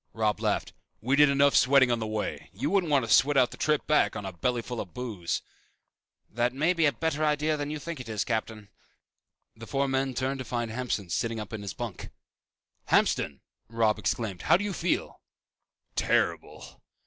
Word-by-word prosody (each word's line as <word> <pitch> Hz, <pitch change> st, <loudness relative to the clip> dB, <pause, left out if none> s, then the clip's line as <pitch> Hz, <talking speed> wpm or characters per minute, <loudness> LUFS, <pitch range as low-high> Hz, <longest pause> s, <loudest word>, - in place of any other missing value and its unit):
Robb 110 Hz, -2 st, 0 dB
laughed. -, -, -1 dB, 0.3 s
"We 130 Hz, +5 st, +1 dB
did 150 Hz, 0 st, +6 dB
enough 140 Hz, 0 st, +4 dB
sweating 130 Hz, -1 st, +5 dB
on 120 Hz, -, +1 dB
the 110 Hz, -, -3 dB
way. 110 Hz, -1 st, -4 dB
You 135 Hz, -, -2 dB
wouldn't 190 Hz, -5 st, +2 dB
want 140 Hz, -5 st, +3 dB
to 115 Hz, -, +2 dB
sweat 145 Hz, +1 st, +4 dB
out 125 Hz, -2 st, +4 dB
the -, -, -8 dB
trip 150 Hz, -1 st, +1 dB
back 150 Hz, -, +2 dB
on 100 Hz, -, -5 dB
a 95 Hz, -, -5 dB
belly 120 Hz, +7 st, -1 dB
full 120 Hz, -1 st, -4 dB
of 90 Hz, -5 st, -10 dB
booze." 110 Hz, -9 st, -3 dB, 0.8 s
"That 120 Hz, +2 st, -1 dB
may 155 Hz, +7 st, +2 dB
be 165 Hz, -3 st, +3 dB
a -, -, +3 dB
better 160 Hz, 0 st, -2 dB
idea 150 Hz, +1 st, +1 dB
than 145 Hz, -1 st, -4 dB
you 155 Hz, -, -3 dB
think 165 Hz, +1 st, -6 dB
it 125 Hz, -3 st, -8 dB
is, 105 Hz, -4 st, -1 dB
Captain." 110 Hz, -2 st, -3 dB, 0.9 s
The 115 Hz, 0 st, -11 dB
four 140 Hz, +2 st, 0 dB
men 135 Hz, -1 st, -1 dB
turned 135 Hz, +2 st, -1 dB
to -, -, -3 dB
find 120 Hz, -2 st, -3 dB
Hamston 110 Hz, -6 st, -3 dB
sitting 115 Hz, +8 st, -1 dB
up 105 Hz, +1 st, -7 dB
on 110 Hz, -, -4 dB
his 100 Hz, -4 st, -6 dB
bunk. -, -, -6 dB, 0.8 s
"Hamston!" 70 Hz, -, +1 dB, 0.3 s
Robb 115 Hz, -2 st, +1 dB
exclaimed, 105 Hz, -6 st, -2 dB
"how -, -, +4 dB
do 200 Hz, -, -4 dB
you 205 Hz, -1 st, -2 dB
feel?" 175 Hz, 0 st, -2 dB, 0.7 s
"Terrible." -, -, -1 dB
125 Hz, 195 wpm, -28 LUFS, 110-145 Hz, 0.9 s, did